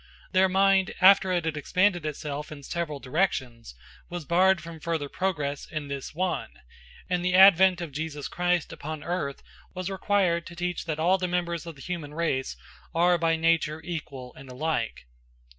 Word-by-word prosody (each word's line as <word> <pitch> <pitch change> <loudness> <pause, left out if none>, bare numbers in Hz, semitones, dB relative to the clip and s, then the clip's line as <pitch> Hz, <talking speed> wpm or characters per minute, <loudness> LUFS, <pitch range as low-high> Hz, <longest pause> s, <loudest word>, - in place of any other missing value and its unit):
Their 190 0 +4
mind, 195 0 +3
after 190 0 +6
it 175 -2 0
had 160 -1 -1
expanded 175 +2 +1
itself 150 0 -5
in 145 -2 -9
several 155 -1 -3
directions, 130 - -2 0.3
was 175 -3 -6
barred 185 +3 +4
from 165 0 -9
further 160 -2 -2
progress 150 -5 -2
in 150 -2 -5
this 140 +2 -6
one; 185 +1 -1 0.6
and 180 -1 -1
the 180 0 +1
advent 190 -1 +7
of 170 -3 -5
Jesus 150 0 -4
Christ 175 -1 0
upon 155 0 -6
earth 165 -6 -3 0.3
was 185 +1 -4
required 190 -3 +1
to 175 - -10
teach 175 0 -3
that 155 -2 -2
all 180 +4 +3
the 180 - -1
members 170 -1 -2
of 165 - -7
the 135 - -14
human 160 -5 -5
race 130 - -1 0.4
are 175 +1 +4
by 165 0 +2
nature 160 -1 +1
equal 140 -7 -6
and 135 - -13
alike. 125 - -2
170 Hz, 170 wpm, -27 LUFS, 150-180 Hz, 0.6 s, advent